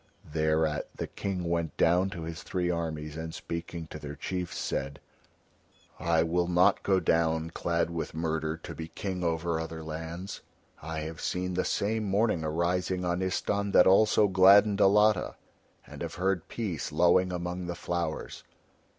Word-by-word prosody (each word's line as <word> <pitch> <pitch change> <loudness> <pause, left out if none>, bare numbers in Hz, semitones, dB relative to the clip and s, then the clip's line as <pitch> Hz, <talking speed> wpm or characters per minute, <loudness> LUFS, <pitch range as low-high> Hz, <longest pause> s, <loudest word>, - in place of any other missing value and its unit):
Thereat 80 0 0
the - - -3
King 95 -3 -4
went 85 -1 -1
down 90 +3 +3
to 85 -3 -6
his 80 +1 -6
three 90 -1 -1
armies 80 -3 -3
and 80 0 -5
speaking 85 0 -5
to 75 - -7
their 75 -1 -7
chiefs 90 +1 -4
said: 70 +1 -3 1.0
"I 80 -1 +2
will 85 +1 0
not 90 +1 +4
go 95 -1 +2
down 80 -1 +1
clad 85 0 -1
with 80 -1 -4
murder 80 -1 -1
to 80 - -8
be 80 0 -6
King 90 +1 -4
over 85 0 0
other 80 0 -5
lands. 80 +4 -6 0.4
I 80 -1 -4
have 80 0 -6
seen 90 0 -2
the 90 - 0
same 110 +2 0
morning 100 -3 +1
arising 90 +3 0
on 90 0 0
Istahn 100 +2 -1
that - - +7
also 105 +2 +5
gladdened 100 +2 +6
Alatta, 105 0 +4 0.5
and - - -11
have - - -4
heard 95 -2 0
Peace 95 -10 -4
lowing 90 +3 +4
among 90 0 -4
the 85 - -3
flowers. 85 -3 -4
85 Hz, 160 wpm, -29 LUFS, 80-95 Hz, 1.0 s, that